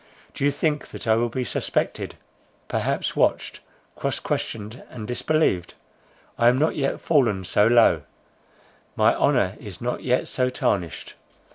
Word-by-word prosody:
Do - - -5
you 145 - +5
think 150 +1 -1
that - - -9
I 110 - +4
will 120 +2 +1
be 125 +2 -2
suspected, 115 - -2 0.5
perhaps - - -1
watched, - - +1 0.4
cross - - -2
questioned, 110 +2 -4
and 110 -4 -8
disbelieved? 125 - 0 0.6
I 120 - +5
am 125 +1 +5
not 155 +4 +1
yet 135 -2 -1
fallen 120 - +2
so 105 +3 +3
low; 115 -9 +5 0.9
my - - +4
honour 95 +2 +2
is 100 -5 -9
not 125 +1 -3
yet 125 0 +1
so 125 -1 0
tarnished. 90 - -2
120 Hz, 145 wpm, -24 LUFS, 105-130 Hz, 0.9 s, you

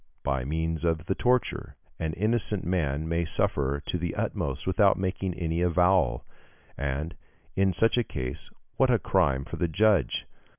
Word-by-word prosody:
By 65 -3 -1
means 80 +2 -2
of 80 -1 0
the 95 - +1
torture, 125 +4 0 0.2
an 80 -1 -2
innocent 105 0 0
man 80 -4 0
may 85 +1 0
suffer 70 -2 0
to - - -1
the 85 -1 -3
utmost - - -2
without 95 +1 +4
making 95 -1 -2
any 85 0 -1
avowal; 90 +2 +3 0.5
and, 70 +4 -3 0.4
in 95 0 +3
such 115 +7 +2
a - - +2
case, 65 - -5 0.3
what 130 - +4
a 120 - +5
crime 70 -10 +1
for - - -6
the 85 - +1
judge! 95 - +2
85 Hz, 160 wpm, -27 LUFS, 75-95 Hz, 0.5 s, a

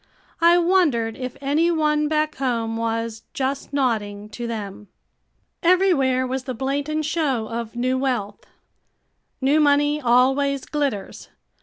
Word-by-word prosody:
I 340 +1 +6
wondered 330 -11 +2
if 255 -1 -6
any 295 +5 +2
one 300 -2 +1
back 310 0 0
home 230 -4 -1
was 230 0 -2
"just 270 +1 -2
nodding" 210 -7 -1
to 235 +2 -6
them. 210 -3 -6 0.7
Everywhere 335 -8 +3
was 260 0 -3
the 255 - -4
blatant 285 +5 -2
show 285 -8 -1
of 230 0 -5
new 255 +2 0
wealth. 240 -7 -3 0.9
New 280 +4 +3
money 290 0 +3
always 270 +3 +2
glitters. 275 -10 -3
265 Hz, 125 wpm, -22 LUFS, 230-300 Hz, 0.9 s, I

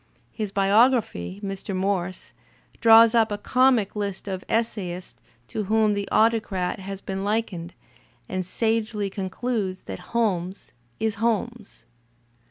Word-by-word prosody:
His 215 -3 -4
biographer, 215 +1 +2
Mr. 195 0 -4
Morse, 185 -1 -2 0.5
draws 225 0 +7
up 225 -2 +3
a 205 - -1
comic 250 -2 +2
list 200 -1 -4
of 190 -1 -4
essay 220 -5 -1
ists 175 -10 -10 0.3
to 215 - -3
whom 215 +1 +3
the 200 -1 -3
Autocrat 215 -6 +1
has 195 0 -7
been 195 0 -4
likened, 200 -5 -2 0.5
and 185 0 -2
sagely 215 +1 -1
con 190 -1 -4
cludes 200 -4 -3
that 95 -1 -6
Holmes 195 -5 -1 0.3
is 220 -1 -1
Holmes. 235 -1 -2
205 Hz, 130 wpm, -24 LUFS, 190-225 Hz, 0.5 s, draws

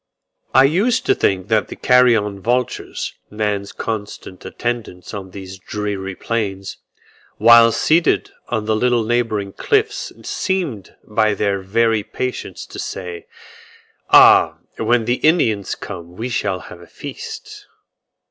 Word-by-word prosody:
I 130 - +8
used 225 - +2
to - - +4
think 95 -1 0
that 110 -1 +2
the - - -8
carrion 115 -6 +3
vultures, 120 +4 -2 0.2
man's 105 -2 -2
constant 105 -4 -6
attendants 115 -7 -5
on 95 -2 -6
these 95 0 -9
dreary 100 -1 -4
plains, 100 -4 -3 0.6
while 115 0 +7
seated 165 +8 +2 0.2
on 110 -3 -2
the 110 0 +1
little 120 +1 +2
neighbouring 110 -4 -1
cliffs 425 0 0
seemed 170 - -3
by 110 -1 +1
their 100 -1 0
very 110 +3 +1
patience 120 +4 -5
to - - -10
say, 90 -2 -6 0.8
"Ah! - - +7 0.2
when 120 -2 +2
the 120 +2 +1
Indians 110 - +2
come 90 -3 -9
we 120 +3 -3
shall 100 -6 -1
have 85 - -12
a 85 - -14
feast." - - -9
110 Hz, 130 wpm, -19 LUFS, 100-120 Hz, 0.8 s, I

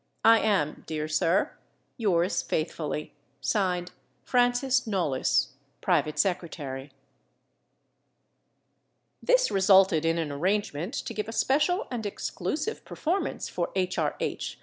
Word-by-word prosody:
I 225 0 +8
am, 195 -9 0
dear 155 -1 -3
sir, 165 +3 +1 0.4
Yours 180 -5 +1
faithfully, 155 -1 -3 0.3
(Signed) 180 +1 0 0.3
FRANCIS 245 0 +2
KNOLLYS, 170 - +1 0.3
Private 155 - +1
Secretary. 150 -8 -2 2.3
This - - +3
resulted 190 -4 +5
in 165 0 +1
an 160 -3 -2
arrangement 185 - -1
to 245 - -4
give 210 -1 -3
a - - -5
special 300 - +2
and 225 -4 -3
exclusive 290 - -3
performance 355 +5 -2
for - - -2
H. 185 -1 0
R. - - 0
H. - - -3
190 Hz, 110 wpm, -27 LUFS, 160-230 Hz, 2.3 s, I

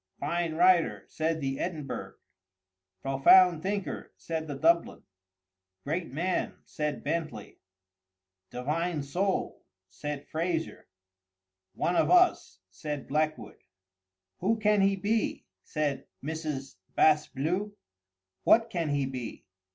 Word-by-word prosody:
"Fine 165 +2 -1
writer!" 175 0 +4
said 160 0 -1
the 135 -1 -2
Edinburgh. 155 -6 -4 0.9
"Profound 155 +6 +6
thinker!" 200 +1 -3
said 160 -1 -4
the 145 - -4
Dublin. 170 +4 +2 0.8
"Great 165 +2 -3
man!" 175 +6 -1
said 150 -1 -3
Bentley. 155 -11 -4 0.9
"Divine 150 +5 -2
soul!" 185 +7 -1 0.3
said 145 +7 -5
Fraser. 165 0 -3 0.9
"One 175 - 0
of - - +3
us!" 360 0 +3
said 150 -3 -5
Blackwood. 155 +2 -1 0.8
"Who 220 +5 +1
can 210 -2 +3
he 195 0 +4
be?" 210 +3 -1 0.2
said 145 -3 -2 0.2
Mrs. 150 -3 -4 0.2
Bas 155 -1 +4
Bleu. 180 +9 -2 0.7
"What 230 0 +5
can 170 -4 -1
he 140 -1 +1
be?" 130 -3 -6
160 Hz, 105 wpm, -29 LUFS, 145-180 Hz, 0.9 s, Profound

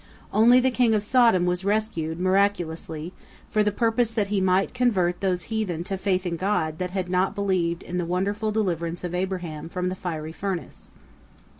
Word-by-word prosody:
Only 235 +4 +6
the 260 +1 +2
king 245 -3 +3
of 205 - 0
Sodom 230 -6 +4
was 180 +1 -1
rescued, 195 -6 -1
miraculously, 180 -4 0 0.4
for 215 - +2
the 210 0 +2
purpose 230 +2 +1
that 210 -3 -1
he 205 -2 +1
might 190 +1 +2
convert 195 -9 +1
those 185 -2 0
heathen 185 -7 -1
to 195 - -3
faith 190 -1 0
in 170 -1 -2
God 160 -5 -1
that 180 0 -2
had 185 0 -3
not 185 +2 +1
believed 185 -4 0
in 180 +1 -3
the 175 - -1
wonderful 205 +4 -1
deliverance 175 -5 -2
of 175 -1 -4
Abraham 180 -4 -3
from 180 +1 -2
the 185 - -3
fiery 160 -4 -5
furnace. 185 -5 -5
185 Hz, 180 wpm, -25 LUFS, 175-210 Hz, 0.4 s, Only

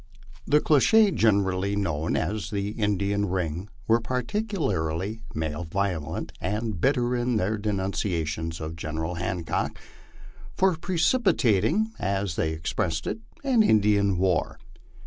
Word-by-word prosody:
The 150 +2 +5
clique 200 +8 +4
generally 100 -3 +2
known 85 -6 -1
as 90 0 -2
the 100 0 -2
* 105 - -8
Indian 100 0 0
ring" 90 +1 -2 0.2
were 115 +1 +4
particularly 120 - -2
malevolent 80 +1 -2
and 105 -4 -2
bitter 125 -1 +2
in 120 0 0
their 105 +1 +1
denunciations 95 -6 -2
of 80 +1 -5
General 80 +1 -3
Hancock 90 -2 -2 0.8
for 190 -2 +3
precipitat 165 - +2
ing, 220 - +1
as 95 -3 -1
they 80 - 0
expressed 80 +1 -2
it, 110 - -3 0.2
an 260 -5 +4
Indian 100 - +3
war. 90 -1 +1
100 Hz, 120 wpm, -26 LUFS, 85-120 Hz, 0.8 s, The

